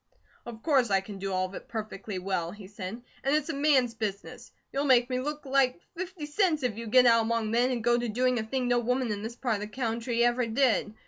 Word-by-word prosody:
"Of 225 -1 -9
course 270 -7 +3
I 195 -1 +4
can 195 +1 -9
do 195 0 -3
all 185 0 +1
of 185 - -8
it - - -8
perfectly 215 -3 -5
well," 180 -2 -2
he 205 +2 -10
said. 205 +3 -7 0.2
"And 275 +2 +2
it's 305 +1 0
a - - -1
MAN'S 275 -4 +3
business. 210 -3 -5 0.2
You'll 280 +1 0
make 250 -2 +4
me 255 - 0
look 295 +3 -4
like 270 0 +2 0.2
fifty 360 -2 -5
cents 310 -1 +1
if 245 -4 0
you 230 +1 -6
get 250 +3 +6
out 230 -1 +6
among 225 -1 -1
men 240 +2 +3
and 245 -3 -2
go 240 +1 +3
to 240 -1 -2
doing 250 +2 +1
a - - -2
thing 250 +3 -2
no 245 0 +3
woman 250 0 0
in 205 -1 -3
this 225 +2 -6
part 240 -4 -1
of - - -8
the 210 - -4
country 235 +1 -1
ever 240 0 +1
did. 225 -3 +1
240 Hz, 250 wpm, -28 LUFS, 215-260 Hz, 0.2 s, get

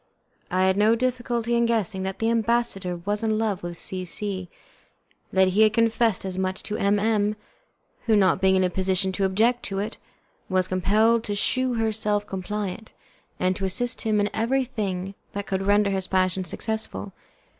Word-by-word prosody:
I 185 0 +1
had 190 +1 +2
no 215 +2 +4
difficulty 240 -1 -1
in 235 0 +3
guessing 220 -4 0
that 190 0 -3
the 225 +1 +1
ambassador 230 -5 0
was 205 +5 -2
in 220 -1 +1
love 215 -4 -1
with 175 -1 -6
C 185 0 -4
C, 185 0 -4 0.8
and - - -8
that 190 0 +6
he 195 +4 +2
had 215 -1 +5
confessed 230 -3 +2
as 190 -1 -3
much 190 0 -2
to 210 - -4
M 200 +1 +2
M, 210 0 +1 0.7
who, 220 - +5
not 190 -2 +3
being 190 0 +4
in 190 - +3
a 180 - +2
position 190 +1 +1
to 195 +1 0
object 225 +6 +2
to 195 - -3
it, 210 +3 -3 0.5
was 185 -1 +1
compelled 215 +5 +2
to 205 - -2
shew 255 +4 +1
herself 215 -2 0
compliant, 205 +2 -5 0.5
and 185 0 +1
to 195 - -5
assist 240 +6 -1
him 215 -2 +1
in 205 0 +1
everything 220 -6 -1 0.2
that 200 0 -4
could 195 0 -2
render 205 0 +4
his 190 -1 -2
passion 185 0 +1
successful. 220 +2 -4
205 Hz, 180 wpm, -25 LUFS, 190-225 Hz, 0.8 s, that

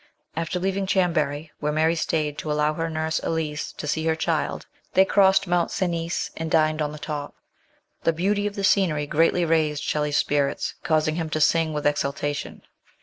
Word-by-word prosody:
After 165 +2 -2
leaving 190 +1 -1
Chambery, 160 -5 0
where 150 0 -1
Mary 160 +2 +2
stayed 155 -3 -1
to 155 - -3
allow 150 0 +1
her 165 +1 -2
nurse 160 0 -1
Elise 155 -2 -2
to - - -7
see 160 +2 -1
her 160 - +2
child, 160 -1 -1 0.3
they 190 - +6
crossed 195 0 +4
Mont 175 -1 +1
Cenis 170 -2 -2
and 160 0 -4
dined 155 -1 +2
on 150 -1 -1
the 150 - -8
top. 150 -2 -5 0.7
The 165 - +3
beauty 200 +5 0
of 205 - -5
the 200 - -3
scenery 185 -7 +2
greatly 165 +4 +2
raised 155 -2 +1
Shelley's 150 -1 0
spirits, 145 -1 0
causing 155 0 +1
him 165 -2 -2
to 155 - -1
sing 160 +1 +3
with 150 -1 -3
exultation. 145 0 -2
160 Hz, 180 wpm, -24 LUFS, 150-170 Hz, 0.7 s, they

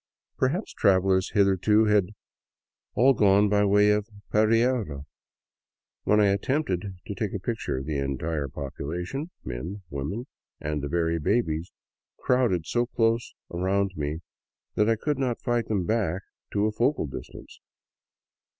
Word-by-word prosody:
Perhaps 150 +11 -1
travelers 95 0 +3
hitherto 100 +2 +4
had 105 -3 +3 0.9
all 135 +3 +5
gone 100 -2 +4
by 105 0 +3
way 105 +1 +5
of 105 +1 0 0.2
Pereira. 110 - +2 1.0
When 105 - +4
I 105 -1 +5
attempted 100 - -1
to - - -4
take - - -3
a - - -2
picture, 65 - -3
the 75 0 -2
entire 70 +2 -2
population, 80 - -5
men, 80 +12 -6
women, 75 - -4 0.3
and 75 -1 -2
the 70 - -4
very 85 0 0
babies, 80 -2 0 0.5
crowded 120 -10 +1
so 120 +5 0
close 115 -1 0 0.2
around 95 +2 +1
me 75 +1 -3 0.5
that 105 +1 +2
I 115 - +4
could 145 +5 -2
not 125 -3 0
fight 120 -1 0
them 100 -5 0
back 100 -4 0 0.3
to 105 0 +2
a 110 - +1
focal 120 - +1
distance. 70 - -9
100 Hz, 135 wpm, -26 LUFS, 80-115 Hz, 1.0 s, all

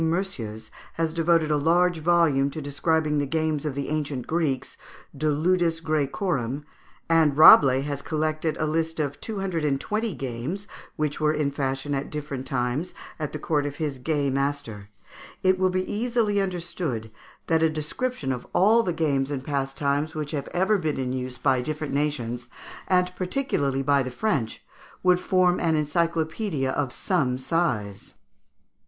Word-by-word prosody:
Meursius, 160 - -3 0.2
has 165 -1 -1
devoted 165 -1 +2
a 150 - +3
large 170 +3 +3
volume 160 -4 +3
to 150 - -6
describing 150 +1 0
the 145 - -1
games 155 0 -1
of 140 - -3
the 140 -1 -3
ancient 145 -4 -2
Greeks 155 -6 -1 0.4
("De 155 +3 -1
Ludis 165 +2 +2
Graecorum"), 150 - -1 0.4
and 160 -4 +3
Rabelais 135 -4 +8
has 140 0 -4
collected 155 +1 -1
a 155 - 0
list 160 +1 -1
of 145 -1 -2
two 215 -3 -4
hundred 180 -5 -2
and 140 -2 +1
twenty 215 0 -2
games 135 +10 -4 0.3
which 150 -1 -2
were 155 0 +3
in 150 -2 0
fashion 135 0 -2
at 135 0 -2
different 145 -3 -5
times 130 +7 -2 0.2
at 150 -2 -3
the - - -4
court 150 -1 0
of 145 - -5
his 145 -4 -3
gay 145 0 0
master, 135 -7 -2 0.5
it 185 0 +3
will 185 0 +3
be 185 0 -1
easily 220 -2 +1
understood 170 - -3 0.3
that 160 -1 +2
a 160 - +4
description 155 - -3
of 125 -1 -4
all 215 +5 +5
the 185 - -1
games 140 -4 0
and 140 -3 -3
pastimes 140 +2 -1
which 150 -2 -3
have 145 -3 -3
ever 190 +3 +1
been 155 -4 -1
in 130 -1 -2
use 130 -1 -4
by 130 -2 +2
different 150 +2 -4
nations, 125 -5 -2 0.4
and 180 0 +2
particularly 180 - -1
by 140 0 +3
the 130 - -3
French, 130 - -2 0.4
would 180 -1 +4
form 180 -1 +2
an 165 -2 +2
encyclopaedia 160 0 0
of 135 -2 -1
some 135 -9 0
size. 130 - -2
150 Hz, 160 wpm, -25 LUFS, 135-170 Hz, 0.5 s, Rabelais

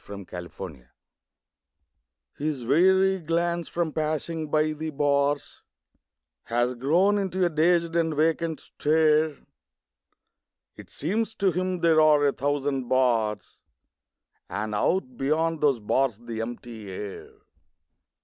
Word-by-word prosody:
THE 100 -1 -8
PANTHER 85 -7 -9 1.5
His 145 -4 -3
weary 190 +7 +4
glance, 170 +1 -1
from 170 -3 -2
passing 155 0 -2
by 155 +1 +2
the 155 +1 -5
bars, 145 -1 0 0.8
Has 120 +2 0
grown 170 +11 +2
into 190 -1 0
a - - +2
dazed 170 +1 +2
and 165 -2 +1
vacant 160 +1 0
stare; 155 0 +2 1.4
It - - -13
seems 220 +8 -2
to 195 -2 +2
him 180 +1 -2
there 160 -2 +5
are 150 -2 +5
a 140 - +4
thousand 140 -2 -1
bars 115 -6 0 0.9
And 105 +1 -3
out 130 - 0
beyond 160 +3 0
those 140 -5 +3
bars 120 +2 0
the 115 -1 -6
empty 115 -2 -7
air. 100 +1 -7
150 Hz, 115 wpm, -26 LUFS, 120-165 Hz, 1.5 s, there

